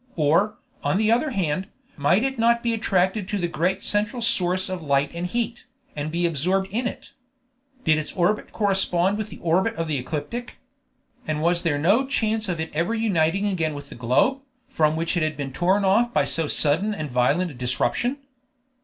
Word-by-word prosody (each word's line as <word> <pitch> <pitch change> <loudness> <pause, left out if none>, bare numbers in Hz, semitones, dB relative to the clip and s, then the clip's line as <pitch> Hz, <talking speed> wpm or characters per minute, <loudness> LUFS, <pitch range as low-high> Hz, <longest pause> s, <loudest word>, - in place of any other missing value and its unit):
or, 165 +7 +2 0.3
on - - +1
the 215 +1 +2
other 245 +7 +2
hand, 185 - -1 0.3
might 170 - +2
it 265 -2 -2
not 235 +1 +3
be 235 -1 +1
attracted 190 -2 0
to 205 - -1
the 175 -3 -1
great 180 +3 -1
central 210 +4 0
source 185 -5 +2
of 185 -2 -4
light 140 -2 +1
and 170 +1 -3
heat, 235 +4 -3 0.3
and 150 +1 -3
be 175 +2 0
absorbed 180 +5 +1
in 240 +4 -1
it? - - -8 0.7
Did 155 -1 +3
its 155 - -4
orbit 195 +4 0
correspond 195 -1 +2
with 215 -1 -4
the - - -10
orbit 185 +7 +1
of 165 -2 -3
the 150 -3 -1
ecliptic? 160 - -5 0.7
and 155 -1 -1
was 170 +2 +2
there 160 -4 0
no 200 - +3
chance 220 -5 -1
of 170 -2 -2
its 160 - -4
ever 170 +8 0
uniting 195 -4 +1
again 165 -7 -1
with 145 0 -9
the - - -9
globe, 130 - +1 0.3
from 155 -1 +1
which 165 +3 -1
it 175 - +1
had 155 -1 -1
been 135 -2 -5
torn 190 +5 +2
off 225 +5 +3
by 145 - +2
so 140 +3 0
sudden 165 +10 +2
and 150 -6 -5
violent 140 +9 +1
a - - -11
disruption? 130 - -1
180 Hz, 195 wpm, -24 LUFS, 155-215 Hz, 0.7 s, not